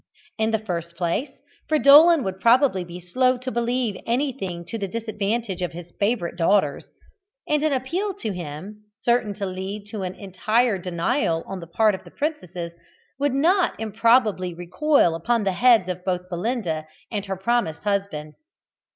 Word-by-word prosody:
In 220 0 +2
the 220 - +2
first 170 -5 -5
place, 180 - -1 0.4
Fridolin 305 +1 +7
would 190 -2 -4
probably 235 -2 +4
be 175 0 -9
slow 255 +9 +1
to 255 +1 -5
believe 235 -3 -1
anything 235 -9 -2
to 225 +6 -5
the 200 - -2
disadvantage 215 -1 -2
of 180 - -2
his 175 0 -10
favourite 200 -5 0
daughters, 165 -4 +1 0.6
and 300 -1 +2
an 310 0 +1
appeal 340 +10 -1
to 230 - -4
him, 180 +4 -7 0.2
certain 235 -4 +1
to 200 -1 -3
lead 190 +2 -5
to 215 - -4
an 185 0 -4
entire 215 +3 0
denial 170 - 0
on 190 - -6
the 170 - -9
part 215 +5 +3
of 190 - -6
the - - -13
princesses, 180 - -4 0.5
would 285 -2 +1
not 350 +6 +2
improbably 215 -4 +2
recoil 175 - +2
upon 215 +8 0
the 195 - +1
heads 225 -1 +4
of 180 -1 -4
both 180 -1 -2
Belinda 175 -5 -2 0.2
and 205 -3 -3
her 195 -1 -3
promised 210 -5 0
husband. 200 -7 -2
205 Hz, 160 wpm, -23 LUFS, 180-245 Hz, 0.6 s, Fridolin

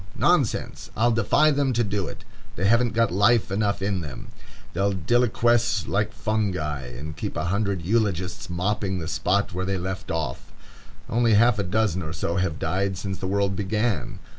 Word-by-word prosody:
Nonsense! - - +1
I'll 120 +2 +3
defy 120 +7 +3
them 140 -2 +1
to 120 0 +2
do 100 -3 -2
it. - - -9 0.3
They 95 - -1
haven't 115 +2 +3
got 115 -4 +3
life 100 +3 +3
enough 100 -1 0
in 100 -2 0
them. 70 -6 -8 0.4
They'll 100 +3 +1
deliquesce 120 +2 +2
like 105 +1 0
fungi, 95 - -2
and 70 +6 -7
keep - - -4
a - - -1
hundred 100 -4 -1
eulogists 95 -4 -1
mopping 95 +2 -1
the 80 -3 -4
spot 100 +3 0
where 90 +1 -2
they 95 +1 -1
left 95 +2 -5
off. 80 -1 -3 0.6
Only 115 -1 +3
half 115 +1 +4
a - - +1
dozen 95 -1 0
or 80 -1 -5
so 85 0 -2
have 90 -5 0
died 95 +4 -1
since 95 0 -4
the 95 - -3
world 100 0 0
began. 105 +2 -1
100 Hz, 175 wpm, -25 LUFS, 90-110 Hz, 0.6 s, half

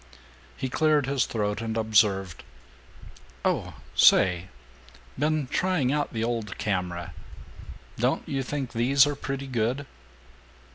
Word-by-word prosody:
He 130 - -2
cleared 150 +1 +2
his 135 -1 0
throat 105 -1 -2
and 115 0 -3
observed, 105 -5 +2 1.0
"Oh - - -1 0.2
say, 90 -1 +5 0.7
been 150 0 +1
trying 160 -2 0
out 150 0 -1
the 110 -2 -2
old 115 -4 -3
camera. 90 -4 -3 0.8
Don't - - 0
you 135 -1 -1
think 135 -1 -4
these 135 +4 +4
are 145 0 -2
pretty 135 0 -4
good?" 125 +2 -1
120 Hz, 115 wpm, -26 LUFS, 105-140 Hz, 1.0 s, say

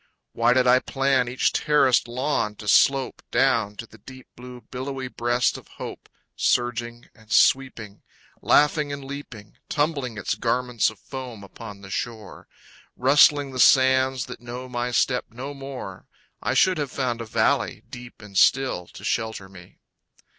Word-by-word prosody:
Why 115 +1 +3
did 130 0 +3
I 125 +1 +5
plan 135 -2 0
each 125 +2 0
terraced 135 -5 +3
lawn 125 -3 -1
to 105 - -11
slope 135 +4 +3
Down 120 -5 +1
to 115 - -8
the 110 0 -18
deep 130 +4 -13
blue 125 0 -11
billowy 130 +1 -6
breast 120 +1 0
of - - -19
hope, - - -8 0.3
Surging 120 -1 -1
and 110 0 -20
sweeping, 115 -4 +2 0.4
laughing 150 0 +3
and 140 -1 -6
leaping, 130 -7 -9
Tumbling 145 -6 -1
its 105 - -2
garments 125 0 0
of 110 - -13
foam 125 -5 -8
upon 100 0 -11
the 95 -1 -11
shore, 110 -1 -6 0.5
Rustling 145 +1 +4
the 130 - -6
sands 130 0 +4
that - - -10
know 125 +1 -7
my 120 0 -3
step 125 +1 +1
no 130 +5 -7
more, 135 -9 -8 0.3
I - - -1
should 185 -4 +3
have 145 -2 -2
found 120 -4 -2
a - - -5
valley, - - 0
deep 120 -2 -11
and 100 -2 -13
still, 125 -4 +2
To - - -13
shelter 110 -4 -2
me. 90 -2 -15
125 Hz, 155 wpm, -24 LUFS, 115-135 Hz, 0.5 s, I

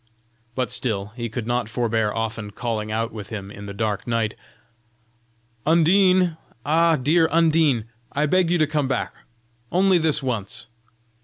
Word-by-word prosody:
But 125 -4 -1
still 105 -4 -2
he 120 -2 -4
could 110 +1 -4
not 120 -1 -1
forbear 110 -2 0
often 115 -1 -3
calling 110 0 -3
out 115 +1 -1
with 105 -3 -8
him 100 -3 -6
in 100 0 -9
the - - -6
dark 105 0 -2
night: 115 -2 0 1.3
"Undine! 180 +1 +4 0.3
Ah! 165 +3 +4
dear 160 +5 +3
Undine, 160 -8 +3 0.3
I 150 +2 +1
beg 180 +2 +2
you 175 - +3
to 155 - +3
come 150 -2 -1
back 135 - -2 0.6
only 185 0 +4
this 155 -3 +1
once!" 120 -1 -3
125 Hz, 150 wpm, -23 LUFS, 110-160 Hz, 1.3 s, Undine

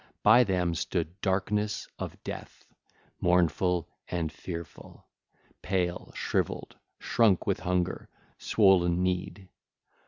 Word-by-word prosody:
By 125 - +7
them 90 -5 0
stood 85 +2 -3
Darkness 100 +2 0
of - - -5
Death, - - -8 0.5
mournful 90 0 +2 0.2
and 80 -3 -2
fearful, 85 +1 -9 0.6
pale, 90 -2 -1
shrivelled, - - -2 0.2
shrunk 105 -6 +2
with - - 0
hunger, 90 -1 -1 0.3
swollen 90 -4 +3
kneed. 90 +1 -2
90 Hz, 95 wpm, -29 LUFS, 85-95 Hz, 0.6 s, By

